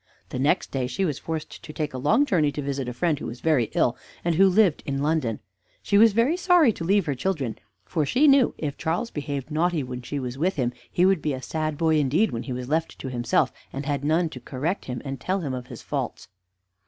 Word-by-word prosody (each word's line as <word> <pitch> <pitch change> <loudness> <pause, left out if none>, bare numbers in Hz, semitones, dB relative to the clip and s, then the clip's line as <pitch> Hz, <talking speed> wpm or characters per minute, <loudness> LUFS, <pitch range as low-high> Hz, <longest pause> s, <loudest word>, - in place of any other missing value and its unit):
The - - -4
next 140 +3 +1
day 130 -2 -1
she 160 +10 -1
was 150 -6 -2
forced 160 -1 -5
to 165 - -9
take 150 -2 -3
a 130 - -4
long 220 - +3
journey 160 - +2
to 145 - -3
visit 135 -2 -2
a - - -5
friend 155 +3 0
who - - -5
was 120 +2 -7
very 150 -6 +2
ill, - - +3 0.3
and 170 - +2
who 190 +4 +5
lived 185 -4 +3
in 135 0 -1
London. 145 -8 0 0.4
She 200 - 0
was 225 -1 +7
very 235 +9 +3
sorry 355 - +4
to 165 - -6
leave 195 +2 +3
her 145 - 0
children, 135 -3 -2 0.3
for 160 -4 0
she 255 - +3
knew 275 -3 +5
if 145 -3 -4
Charles 175 +9 -1
behaved 145 -1 -4
naughty 165 0 +1
when 125 -1 -6
she 135 +4 -5
was 125 0 -5
with 185 +5 +1
him, 125 -3 0 0.2
he 180 - +3
would 190 -4 +3
be 150 - -1
a 130 - -4
sad 155 -2 -2
boy 160 -1 +3
indeed 150 +10 +2
when 115 - -3
he 130 - -6
was 125 0 -4
left 160 +3 -1
to 130 - -6
himself, 120 -2 +1 0.2
and 135 +1 -5
had 140 -2 -1
none 160 +3 +2
to - - -9
correct 155 +9 -3
him 125 -1 -5
and 135 -1 -4
tell 190 +8 -1
him 140 -5 -3
of 125 -1 -5
his 120 -3 -10
faults. - - -4
150 Hz, 245 wpm, -25 LUFS, 130-180 Hz, 0.4 s, was